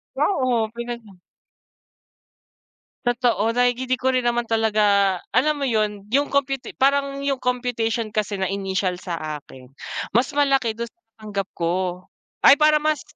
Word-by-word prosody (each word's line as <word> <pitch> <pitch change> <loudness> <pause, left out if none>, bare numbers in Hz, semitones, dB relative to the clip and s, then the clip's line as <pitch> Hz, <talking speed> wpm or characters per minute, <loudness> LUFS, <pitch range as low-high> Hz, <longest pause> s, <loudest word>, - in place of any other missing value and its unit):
Wow, 390 - +1
oh, 235 -4 +1
pinag. 235 -5 -7 1.9
Totoo 235 -2 +1
like 245 +1 +1
di 255 0 0
ko 260 - +1
rin 255 -1 +1
naman 240 0 +1
talaga 210 -4 +3
alam 290 +3 +1
mo - - +1
yun 210 -2 -1
yung 280 +4 +1
computi 275 -2 -1
parang 275 +1 +1
yung 280 -1 0
computation 240 -3 -1
kasi 210 -1 -2
na 190 - 0
initial 190 -2 -1
sa 155 -4 -4
akin 130 -2 -15 0.5
mas 245 +2 +3
malaki 275 -5 +2
dun 235 +1 -5
sa - - -58 0.2
natanggap 200 -2 -4
ko. 170 0 -1 0.7
Ay - - +10
parang 305 0 +5
mas 305 -2 +1
235 Hz, 145 wpm, -22 LUFS, 205-260 Hz, 1.9 s, Ay